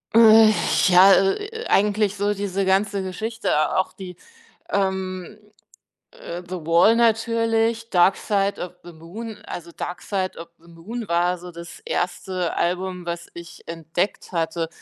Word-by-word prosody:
Äh, 220 Hz, -1 st, +8 dB, 0.4 s
ja, 185 Hz, +1 st, +7 dB
äh 195 Hz, 0 st, +4 dB
äh, 450 Hz, +2 st, -7 dB
eigentlich 205 Hz, 0 st, +2 dB
so 205 Hz, +1 st, 0 dB
diese 195 Hz, -1 st, -2 dB
ganze 195 Hz, +1 st, +1 dB
Geschichte, 190 Hz, -4 st, -1 dB
auch 190 Hz, -, 0 dB
die, 185 Hz, -2 st, -9 dB, 0.5 s
ähm, 190 Hz, 0 st, -2 dB, 0.7 s
äh 175 Hz, +1 st, -8 dB
The 185 Hz, +1 st, -5 dB
Wall 170 Hz, +7 st, +5 dB
natürlich, 230 Hz, 0 st, +1 dB
Dark 185 Hz, +1 st, +4 dB
Side 200 Hz, -1 st, -1 dB
of 180 Hz, -, -5 dB
the 175 Hz, -, -11 dB
Moon. 205 Hz, +8 st, -9 dB
Also, 170 Hz, -1 st, -7 dB
Dark 175 Hz, +1 st, -6 dB
Side 190 Hz, -2 st, -2 dB
of 165 Hz, -, -9 dB
the 170 Hz, -, -22 dB
Moon 205 Hz, +8 st, -8 dB
war 175 Hz, +1 st, +1 dB
so 180 Hz, +1 st, -10 dB
das 170 Hz, 0 st, -11 dB
1. 180 Hz, 0 st, -2 dB
Album, 180 Hz, 0 st, -2 dB
was 170 Hz, 0 st, -5 dB
ich 170 Hz, 0 st, -12 dB
entdeckt 165 Hz, +5 st, -3 dB
hatte. 165 Hz, -1 st, -2 dB
190 Hz, 145 wpm, -22 LUFS, 175-210 Hz, 0.7 s, Äh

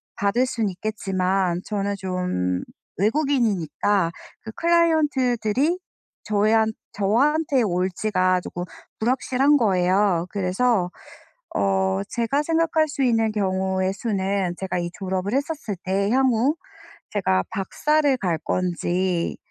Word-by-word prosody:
받을 205 Hz, +6 st, +1 dB
수는 230 Hz, -5 st, -1 dB
있겠지만 185 Hz, -2 st, -1 dB
저는 200 Hz, -1 st, -2 dB
좀 180 Hz, -, -2 dB, 0.3 s
외국인이니까 205 Hz, -, +1 dB, 0.3 s
그 220 Hz, -, -8 dB
클라이언트들이 300 Hz, -, +2 dB, 0.4 s
저한 220 Hz, +1 st, +2 dB, 0.2 s
저한테 265 Hz, +7 st, +2 dB
올 180 Hz, -2 st, 0 dB
지가 185 Hz, -2 st, +1 dB
쪼끔 175 Hz, 0 st, -6 dB, 0.4 s
불확실한 260 Hz, +4 st, +2 dB
거예요. 185 Hz, -4 st, +2 dB
그래서 195 Hz, 0 st, +1 dB, 0.7 s
어 95 Hz, -1 st, +1 dB
제가 240 Hz, +5 st, 0 dB
생각할 325 Hz, 0 st, +2 dB
수 280 Hz, -1 st, -2 dB
있는 225 Hz, -3 st, +2 dB
경우의 190 Hz, -2 st, 0 dB
수는 195 Hz, -4 st, -1 dB
제가 190 Hz, -1 st, -3 dB
이 175 Hz, 0 st, -2 dB
졸업을 190 Hz, +2 st, -3 dB
했었을 280 Hz, -6 st, -2 dB
때 195 Hz, +1 st, 0 dB
향후 260 Hz, +2 st, +3 dB, 0.6 s
제가 95 Hz, -, +1 dB
박사를 290 Hz, +8 st, +1 dB
갈 175 Hz, -7 st, -1 dB
건지 180 Hz, 0 st, -1 dB
205 Hz, 245 characters per minute, -23 LUFS, 185-255 Hz, 0.7 s, 향후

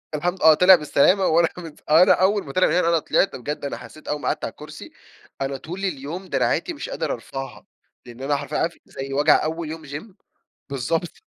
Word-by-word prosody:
الحمد 175 Hz, +5 st, -2 dB
آه، 160 Hz, -, +8 dB
طلع 180 Hz, +4 st, +7 dB
بالسلامة 175 Hz, +5 st, +3 dB
وأنا 165 Hz, +1 st, +3 dB
مت 165 Hz, -4 st, -10 dB
أنا 165 Hz, +4 st, +7 dB
أول 195 Hz, +2 st, +2 dB
ما 135 Hz, -, -7 dB
طلع 185 Hz, -, +3 dB
من -, -, 0 dB
هنا، 175 Hz, -1 st, +2 dB
أنا 165 Hz, -1 st, +3 dB
طلعت 195 Hz, -, +1 dB
بجد، 145 Hz, +3 st, -5 dB
أنا -, -, -4 dB
حسيت 155 Hz, -, -13 dB
أول 150 Hz, 0 st, -2 dB
ما -, -, -4 dB
قعدت -, -, -1 dB
على -, -, -5 dB
الكرسي، -, -, -11 dB, 0.5 s
أنا 135 Hz, 0 st, -2 dB
طول 170 Hz, +8 st, -8 dB
اليوم 165 Hz, +3 st, -5 dB
دراعاتي 350 Hz, -, 0 dB
مش 310 Hz, -, -7 dB
قادر -, -, -2 dB
أرفعها؛ 135 Hz, 0 st, -8 dB, 0.4 s
لإن 120 Hz, +1 st, -12 dB
أنا 145 Hz, +1 st, 0 dB
حرفيًا 145 Hz, 0 st, -4 dB
عارف 170 Hz, +1 st, -1 dB
زي 135 Hz, 0 st, -7 dB
وجع 145 Hz, +2 st, +4 dB
أول 160 Hz, 0 st, -3 dB
يوم 160 Hz, 0 st, -7 dB
جيم؟ 150 Hz, +8 st, -9 dB, 0.6 s
بالضبط. 165 Hz, -, -3 dB
160 Hz, 205 wpm, -23 LUFS, 145-180 Hz, 0.6 s, آه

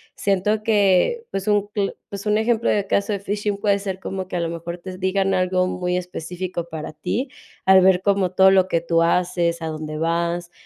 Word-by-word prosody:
siento 205 Hz, +2 st, 0 dB
que, 210 Hz, -, +3 dB
pues, 195 Hz, +1 st, -4 dB
un 205 Hz, -1 st, +2 dB
cl 200 Hz, -2 st, -1 dB, 0.2 s
pues 200 Hz, 0 st, -7 dB
un 210 Hz, 0 st, +2 dB
ejemplo 230 Hz, +1 st, +1 dB
de 205 Hz, -2 st, +1 dB
caso 200 Hz, +2 st, 0 dB
de 200 Hz, -, -2 dB
phishing 205 Hz, +1 st, -2 dB
puede 200 Hz, 0 st, +1 dB
ser 190 Hz, -2 st, -4 dB
como 190 Hz, -1 st, -5 dB
que 185 Hz, -, -6 dB
a 175 Hz, -, 0 dB
lo 165 Hz, -, -1 dB
mejor 170 Hz, +1 st, -6 dB
te 185 Hz, +1 st, -8 dB
digan 190 Hz, +1 st, 0 dB
algo 185 Hz, 0 st, +1 dB
muy 180 Hz, -1 st, -2 dB
específico 180 Hz, 0 st, -5 dB
para 160 Hz, -2 st, -6 dB
ti, 245 Hz, -, -3 dB, 0.4 s
al 190 Hz, 0 st, +7 dB
ver 185 Hz, -1 st, +4 dB
como 195 Hz, -2 st, +1 dB
todo 190 Hz, +1 st, +6 dB
lo 190 Hz, -1 st, +4 dB
que 170 Hz, -3 st, 0 dB
tú 170 Hz, 0 st, +1 dB
haces, 170 Hz, 0 st, +1 dB
a 160 Hz, -, -3 dB
dónde 155 Hz, -1 st, -5 dB
vas. 170 Hz, +2 st, -1 dB
185 Hz, 210 wpm, -22 LUFS, 170-200 Hz, 0.4 s, al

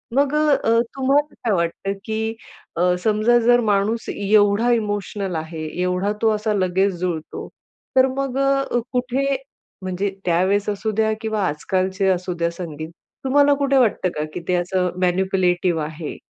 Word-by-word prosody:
मग 280 Hz, +1 st, +2 dB
अ, 275 Hz, -7 st, +3 dB, 0.2 s
तुम्हाला 280 Hz, +3 st, +1 dB
काय 225 Hz, -, +2 dB
वाटतं? 170 Hz, +2 st, -1 dB
की 220 Hz, +1 st, -2 dB, 0.4 s
अ, 180 Hz, +1 st, +2 dB
समजा 220 Hz, +2 st, +3 dB
जर 240 Hz, +1 st, +4 dB
माणूस 210 Hz, +3 st, 0 dB
एवढा 205 Hz, +3 st, +3 dB
इमोशनल 205 Hz, -4 st, -2 dB
आहे, 160 Hz, 0 st, -5 dB, 0.2 s
एवढा 180 Hz, +3 st, 0 dB
तो 225 Hz, -, +4 dB
असा 215 Hz, 0 st, -1 dB
लगेच 190 Hz, 0 st, +1 dB
जुळतो. 170 Hz, -4 st, -4 dB, 0.5 s
तर 260 Hz, 0 st, +6 dB
मग 270 Hz, -1 st, -2 dB
अ, 275 Hz, -2 st, +1 dB
कुठे 255 Hz, +2 st, 0 dB, 0.5 s
म्हणजे 185 Hz, +2 st, -1 dB, 0.2 s
त्यावेळेस 185 Hz, +4 st, +2 dB
असू 210 Hz, +2 st, -2 dB
द्या 220 Hz, +1 st, +1 dB
किंवा 220 Hz, -2 st, -2 dB
आजकालचे 185 Hz, +5 st, -1 dB
असू 185 Hz, 0 st, 0 dB
द्या 170 Hz, 0 st, 0 dB
संगीत, 160 Hz, -3 st, -7 dB, 0.3 s
तुम्हाला 285 Hz, +2 st, +4 dB
कुठे 275 Hz, -1 st, +1 dB
वाटतं 225 Hz, -7 st, +2 dB
का, 150 Hz, -, -1 dB
की -, -, -4 dB
ते 180 Hz, -, +1 dB
असं 180 Hz, +1 st, 0 dB
मॅनिप्युलेटिव्ह 180 Hz, -2 st, +1 dB
आहे? 155 Hz, 0 st, -6 dB
205 Hz, 145 wpm, -21 LUFS, 180-240 Hz, 0.5 s, तर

